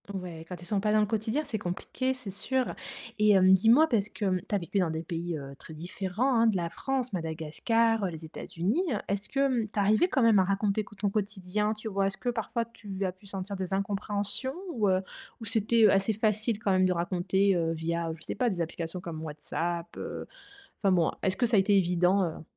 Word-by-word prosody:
Ouais. 175 -4 -6
Quand 180 - -4
ils - - -10
sont 200 +1 0
pas 210 +1 +1
dans 215 - +4
le 210 - +4
quotidien, 220 +7 -1
c'est 220 - -3
compliqué, 210 +8 -2
c'est 255 -6 -8
sûr. 255 +6 -1 0.5
Et 210 0 +5
hem, 190 -1 +6
dis-moi, 230 - +6
parce 215 -7 +1
que, 210 - -4
hem, 185 -2 +1
tu 210 - 0
as - - +4
vécu 190 +2 -2
dans 180 -3 +2
des 160 +1 -3
pays, 170 0 -3
heu, 140 -1 -8
très 160 - -11
différents 190 - -1
hein, 230 - +5
de 215 -4 +2
la 170 -1 -2
France, 255 +2 -2
Madagascar, 185 +7 0
heu, 190 - +1
les 160 -1 -7
États-Unis. 180 - -2 0.2
Est-ce 200 +1 -2
que, 270 - -2
hem, 250 -6 +2
tu 210 - -2
arrivais 215 - +4
quand 270 -8 +1
même 225 -3 +6
à - - +5
raconter 200 +2 0
quo 210 - -15
ton 200 0 0
quotidien? 205 0 -1
Tu 215 +1 -8
vois? 195 -2 +1
Est-ce 195 - -4
que 245 - -2
parfois 235 0 -2
tu 200 -4 -6
as 185 - 0
pu 185 +3 -19
sentir 195 +1 -5
des 190 0 -3
incompréhensions? 205 +6 -2 0.2
Ou, 215 -5 +2
heu, 185 0 +3 0.4
ou 225 - -7
c'était, 225 +1 +2
heu, 205 - +7
assez 195 +3 +3
facile 215 +1 +1
quand 210 -3 0
même 185 0 +4
de 185 - +3
raconter, 185 +3 +1
heu, 165 -1 +1
via, 165 +1 -2
je 160 0 -13
sais - - -4
pas, 245 +2 +2
des 185 -5 -2
applications 165 +1 -4
comme 165 -3 -6
WhatsApp? 170 +3 -4
Heu, - - -5 0.6
enfin 195 - +3
bon, 175 -3 +3
est-ce 190 0 +1
que 245 - +2
ça 225 -2 +3
a - - +7
été 200 +1 +3
évident, 180 +1 +3
heu? 160 -3 -4
195 Hz, 235 wpm, -29 LUFS, 175-220 Hz, 0.6 s, heu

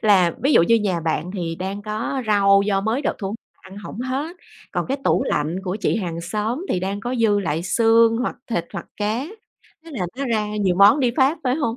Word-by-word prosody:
Là 190 -5 +4
ví 280 - +3
dụ - - +6
như 230 +7 +4
nhà 195 -6 0
bạn 165 +1 -2
thì 170 -4 -3
đang 190 +4 -5
có 220 +5 -3
rau 200 -1 +4
do 200 -1 +1
mới 225 +7 -1
được - - -1
thu 195 0 -4 0.3
ăn 190 +1 -13
hổng 210 +2 -8
hết, 275 +7 -3 0.4
còn - - -1
cái 270 - -1
tủ - - +2
lạnh 150 +4 -1
của 185 +1 -2
chị - - +1
hàng 170 -6 -3
xóm 215 - -3
thì 180 - 0
đang 195 +2 -3
có 245 +4 -3
dư 210 -3 +3
lại 165 -3 -2
xương 230 +3 +4
hoặc 250 - -2
thịt 175 -9 -2
hoặc 185 -4 -6
cá, 215 +6 -1 0.6
thế 330 - -12
là 210 - -3
nó 275 - -2
ra 220 -3 0
nhiều 190 -4 +1
món 200 +9 +6
đi 250 -3 +2
phát, 280 +4 +3
phải 250 -1 +2
hông? 240 -6 -1
210 Hz, 230 wpm, -22 LUFS, 190-240 Hz, 0.6 s, dụ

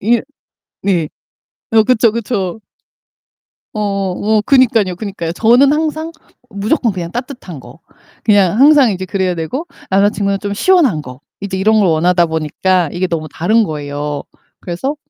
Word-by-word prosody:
이 230 +3 +2 0.6
네. 175 -6 0 0.6
어, 220 -1 +5
그쵸, 230 -1 +3
그쵸. 215 -3 -3 1.2
어, 200 -3 -1
뭐 215 +3 +1
그니깐요, 225 -7 +3
그니까요. 185 -5 -5
저는 245 - +4
항상 315 +1 -2 0.4
무조건 215 +3 0
그냥 170 -2 -5
따뜻한 245 - -7
거. 125 +5 -14 0.4
그냥 205 0 +3
항상 280 -5 +6
이제 185 0 -4
그래야 185 -1 -1
되고 175 - -4 0.2
남자 195 +2 +3
친구는 200 -1 -1
좀 205 -1 -4
시원한 260 - +2
거. 125 0 -11 0.2
이제 195 -1 -4
이런 215 +3 +3
걸 200 - +3
원하다 170 +2 +2
보니까 160 +2 0
이게 185 +1 -1
너무 160 -3 -3
다른 220 +7 +2
거예요. 145 -3 -4 0.4
그래서 260 - -4
200 Hz, 295 characters per minute, -15 LUFS, 175-230 Hz, 1.2 s, 항상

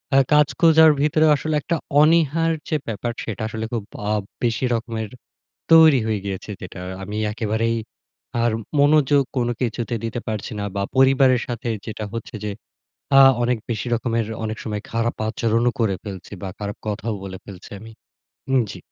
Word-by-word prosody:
আ - - +7 0.2
কাজ 150 -1 +6
খুঁজার 160 -1 +7
ভেতরে 155 +1 +3
আসলে 155 +2 -2
একটা 170 - -1 0.3
অনীহার 165 +1 +3 0.2
যে - - +1
ব্যাপার, 115 +2 -3
সেটা 110 -2 -5
আসলে 110 0 -4
খুব 115 -3 -2 0.3
আ - - +1 0.3
বেশি 115 +1 +1
রকমের 115 -2 -3 0.6
তৈরি 160 -5 +8
হয়ে 110 -2 0
গিয়েছে। 100 +1 -5
যেটা 95 0 -8 0.2
আমি 105 +2 -5
একেবারেই 110 +1 -1 0.7
আর 120 - +2 0.3
মনোযোগ 145 -1 +4
কোন 120 - +1
কিছুতে 120 0 -2
দিতে 115 +1 -3
পারছি 110 +2 -4
না। - - -2
বা 100 - 0
পরিবারের 130 -1 +5
সাথে 120 -1 -4 0.2
যেটা 110 -1 -5
হচ্ছে 115 +2 -6
যে 105 - -2 0.7
আ - - +9 0.2
অনেক 120 0 +1
বেশি 110 -1 -2
রকমের 115 -1 -1 0.2
অনেক 110 0 -4
সময় 105 -2 -4
খারাপ 115 +1 -1
আচরণও 115 +2 +1
করে 110 -4 +2
ফেলছি 100 -2 -8
বা 95 - -4
খারাপ 100 -1 -5
কথাও 105 +2 -2
বলে 95 -1 -7
ফেলছি 95 -2 -11
আমি। 110 +1 -11 0.6
উম 135 -1 +4
জী। - - -8
115 Hz, 165 wpm, -22 LUFS, 110-135 Hz, 0.7 s, আ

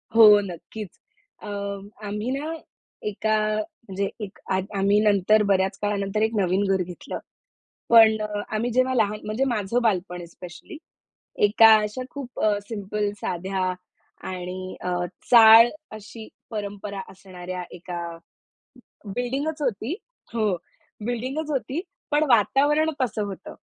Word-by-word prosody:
हो, 230 - +8 0.2
नक्कीच. 195 +2 -8 0.4
अ, - - -7 0.6
आम्ही 210 +4 -3
ना 295 +4 -3 0.5
एका 215 +1 -1
आ, 215 0 +1 0.3
म्हणजे 195 0 -2
एक 200 -1 -9
आद 190 0 +1
आम्ही 200 +1 +3
नंतर 210 0 +4
बऱ्याच 190 0 +2
काळानंतर 205 0 -1
एक 220 0 +2
नवीन 190 -1 +2
घर 190 - 0
घेतलं. 180 0 -7 0.7
पण 225 -2 +7
अ, 210 -1 -3
आम्ही 235 +3 -1
जेव्हा 255 +2 +2
लहान 210 -2 +1
म्हणजे 215 +5 -1
माझं 230 0 0
बालपण 180 -5 -1
स्पेशली 175 - -11 0.7
एका 220 +1 +7
अशा 210 +4 -4
खूप 270 -4 -8
अ, 210 -1 +3
सिंपल 205 -1 -2
साध्या 185 +1 -2 0.6
आणि 185 0 -6
अ, 180 0 -1 0.4
चाळ 230 0 +9 0.3
अशी 215 +1 -11 0.2
परंपरा 205 -1 -5
असणाऱ्या 185 -1 -7
एका 175 0 -6 1.1
बिल्डिंगच 275 +6 -2
होती. 250 - -1 0.4
हो, 215 -5 +1 0.5
बिल्डिंगच 255 +6 -3
होती. 275 +3 -2 0.3
पण 295 +1 +3
वातावरण 285 +7 +4
तसं 220 -4 -1
होतं. 195 -2 -8
210 Hz, 125 wpm, -24 LUFS, 190-235 Hz, 1.1 s, चाळ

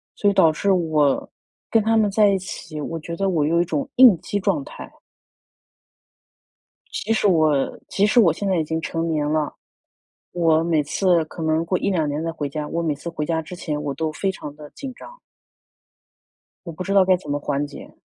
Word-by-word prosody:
所 205 - +2
以 - - +1
导 165 -5 +5
致 195 +6 0
我 155 -6 +1 0.4
跟 225 - +4
他 225 +1 +2
们 215 -2 +3
在 210 0 +4
一 195 - +2
起， 165 -4 -7
我 165 +2 -4
觉 170 +2 -6
得 195 +2 0
我 155 -5 +1
有 170 +2 +2
一 - - 0
种 155 -4 -3
应 250 -6 +8
激 205 - -2
状 275 +8 0
态。 305 - -10 2.0
即 225 - -2
使 220 - +1
我 155 -7 +2
即 200 - +2
使 240 +3 +5
我 175 -8 +5
现 200 +5 -4
在 190 - +2
已 160 - 0
经 160 +1 -2
成 165 +1 -3
年 155 -2 0
了。 155 -1 -1 0.8
我 165 -2 +2
每 165 -2 +2
次 170 +3 +1
可 165 +1 -8
能 160 +1 +1
过 180 +2 0
1-2 180 -6 0
年 150 +2 -3
再 165 - -2
回 150 -3 -4
家， 150 +1 -4
我 170 - -2
每 160 -3 -1
次 155 +4 -7
回 155 -2 -4
家 160 0 -1
之 170 +3 -9
前 150 -4 -4
我 145 -1 -2
都 160 +2 -2
非 190 +5 -1
常 145 -6 -9
地 150 -1 -12
紧 270 -2 -8
张。 - - -13 1.5
我 170 - -6
不 165 - -6
知 195 +2 -2
道 195 -1 +6
该 185 0 +4
怎 150 -5 -9
么 145 - 0
缓 145 0 -2
解。 145 - -12
165 Hz, 225 characters per minute, -22 LUFS, 155-195 Hz, 2.0 s, 应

